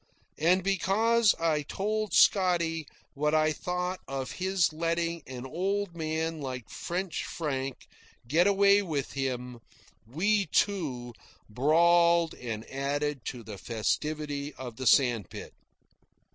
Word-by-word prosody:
And 180 +4 +3
because 210 +4 +3
I 160 -2 +1
told 210 +7 -2
Scotty 170 -5 +3 0.3
what 150 +2 0
I 155 0 +3
thought 180 +3 -3
of 135 -1 -4
his 185 -3 +1
letting 170 +1 -1
an 130 -1 -7
old 190 +5 -2
man 160 0 -2
like 130 -4 -6
French 180 -1 -3
Frank 135 -5 -4 0.4
get 165 +8 +3
away 200 0 +5
with 155 -8 -3
him, 125 -3 -3 0.5
we, 195 - +1
too, 135 -12 -1 0.3
brawled 170 +6 +4
and 115 -3 -6
added 140 0 -2
to 125 -2 -5
the 105 -3 -9
festivity 145 +5 -2
of 125 -3 -8
the 130 - -2
sandspit. 120 - +2
155 Hz, 115 wpm, -29 LUFS, 135-180 Hz, 0.5 s, away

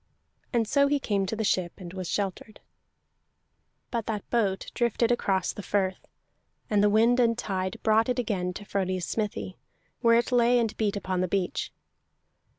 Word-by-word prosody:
And 230 -3 +1
so 280 +4 +4
he 290 0 +1
came 200 -6 0
to 220 - -2
the 220 - -2
ship, 185 -4 0
and 175 -2 -9
was 185 -2 -5
sheltered. 205 +2 -3 1.3
But 230 -3 -2
that 215 -2 -3
boat 205 -5 0
drifted 235 0 +1
across 195 -5 +1
the - - -7
firth, 190 -1 -1 0.6
and 205 -1 +4
the 205 - +5
wind 230 +4 +4
and 230 -1 +3
tide 190 -4 -2
brought 220 +2 +3
it 250 - 0
again 200 -7 -1
to 205 - -8
Frodi's 185 -3 -1
smithy, 210 -3 -3 0.4
where 230 -1 +5
it 240 +2 0
lay 245 0 +4
and 230 -3 0
beat 210 -2 0
upon 185 -2 -2
the 185 - +1
beach. 185 0 -1
210 Hz, 170 wpm, -27 LUFS, 190-235 Hz, 1.3 s, the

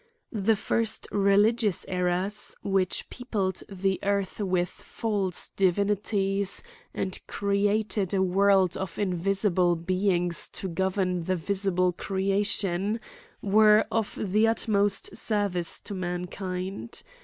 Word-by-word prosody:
The 220 0 +2
first 220 +2 -1
religious 205 +1 +2
errors, 180 +3 0
which 195 -2 0
peopled 205 -7 -2
the 195 -1 -1
earth 200 -1 -1
with 185 -3 +1
false 200 -5 -2
divinities, 195 +1 +1 0.3
and 190 -1 -2
created 200 -1 0
a 190 -2 +2
world 190 -1 +3
of 190 -3 -5
invisible 185 -1 +1
beings 180 0 0
to 190 - -4
govern 185 0 -1
the 185 - +1
♦ - - -3
visible 185 0 0
creation, 195 +1 0 0.4
were 210 +1 +5
of 225 -2 -1
the 215 +3 +2
utmost 205 -3 +1
service 200 -6 0
to - - -7
mankind. 185 +3 -4
195 Hz, 110 wpm, -27 LUFS, 185-205 Hz, 0.4 s, were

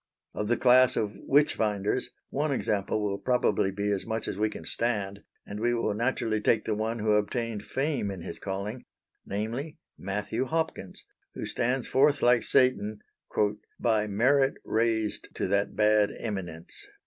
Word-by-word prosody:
Of 105 - -3
the 120 - +2
class 130 0 +5
of 105 -2 0 0.2
Witchfinders 110 -6 +2 0.2
one 145 +2 0
example 105 -4 0
will 100 -1 -1
probably 125 -6 +2
be 100 +1 -1
as 100 -2 0
much 110 -1 -3
as 95 - -4
we 110 0 +2
can - - -9
stand, 100 -4 -1 0.3
and 100 +1 -6
we 120 +2 +1
will 115 -3 0
naturally 115 -1 0
take 110 0 +2
the 110 - 0
one 110 +2 -1
who 110 -1 +1
obtained 105 0 0
fame 135 -6 -1
in 95 -4 -6
his 85 - -7
calling 100 +5 -4 0.4
namely 115 +10 -3 0.2
Matthew 105 +5 -2
Hopkins, 160 - -3 0.3
who - - -4
stands 125 +1 -1
forth 140 +2 +3
like 120 0 +5
Satan, 110 -6 +2 0.8
"by 110 -3 +2
merit 135 +7 +3
raised 110 -2 0
to - - -1
that 100 +1 +1
bad 105 -1 +4
eminence." 95 -7 -5
110 Hz, 155 wpm, -28 LUFS, 105-125 Hz, 0.8 s, class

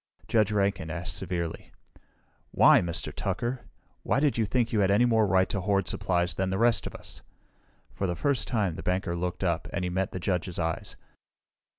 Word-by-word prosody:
Judge 110 -2 +2
Rankin 100 -5 0
asked 85 +1 -4
severely, 85 -2 -4 0.8
"Why, - - +6
Mr. 85 -2 -3
Tucker? 125 +1 -3 0.4
Why - - +1
did 145 -1 +2
you 115 - +1
think 115 +2 0
you 110 - +2
had 95 -1 +3
any 105 +5 +4
more 110 -3 +3
right 95 0 +3
to 100 - -2
hoard 100 0 +1
supplies 90 -2 0
than 95 +3 -1
the 95 - -1
rest 115 +2 +3
of - - -9
us?" - - -10 0.7
For 95 - -2
the 90 - -2
first 125 - +1
time 100 -9 0
the - - -5
banker 90 -1 -1
looked 90 +2 -3
up, 85 -2 0
and 95 - -2
he 90 - -2
met 95 +1 -1
the 95 - -5
judge's 90 -1 -2
eyes. 80 -1 -3
95 Hz, 195 wpm, -28 LUFS, 90-110 Hz, 0.8 s, Why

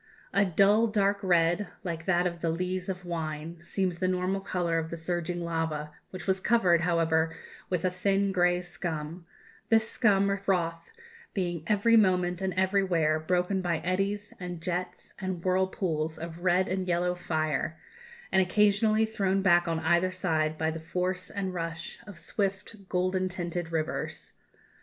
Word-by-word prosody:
A 200 - +4
dull 200 +5 +4
dark 200 -2 +1
red, 175 +1 +2 0.2
like 165 -2 -4
that 180 -1 +2
of 170 -1 -2
the 165 - 0
lees 180 +2 -2
of 180 -1 -4
wine, 165 -1 -4
seems 180 0 -1
the 185 - +1
normal 185 +1 0
colour 175 -3 0
of 160 0 -4
the 170 - -5
surging 175 +1 -2
lava, 160 -2 -2 0.2
which 185 -2 -7
was 190 -1 +1
covered, 190 -6 +3
however, 165 -2 +1 0.3
with 180 -1 -1
a 185 - +2
thin 195 +2 +1
grey 180 -1 +2
scum 170 -1 -5 0.4
this 225 -1 +4
scum, 200 -3 +3
or 200 - 0
froth, 175 -4 -1 0.5
being 175 -4 -1
every 215 +2 +4
moment 180 -3 +2
and 190 0 0
everywhere 185 -5 +2
broken 180 +4 0
by 175 -2 0
eddies 195 +4 -1
and 180 -2 -5
jets 180 +1 -4
and 185 -3 -3
whirlpools 185 -4 0
of 170 +1 -7
red 185 +1 +3
and 185 0 -2
yellow 180 0 +1
fire, 160 -2 -2 0.5
and 190 - +5
occasionally 210 +3 +3
thrown 195 -3 0
back 175 -2 +4
on 165 -1 0
either 170 +3 +3
side 160 -4 0
by 160 0 0
the 165 - -5
force 180 +3 -2
and 190 -2 -3
rush 165 -1 -5
of 205 -4 -10
swift 195 +2 -4
golden 185 +1 0
tinted 175 -2 -4
rivers. 160 -1 -3
180 Hz, 160 wpm, -29 LUFS, 170-190 Hz, 0.5 s, and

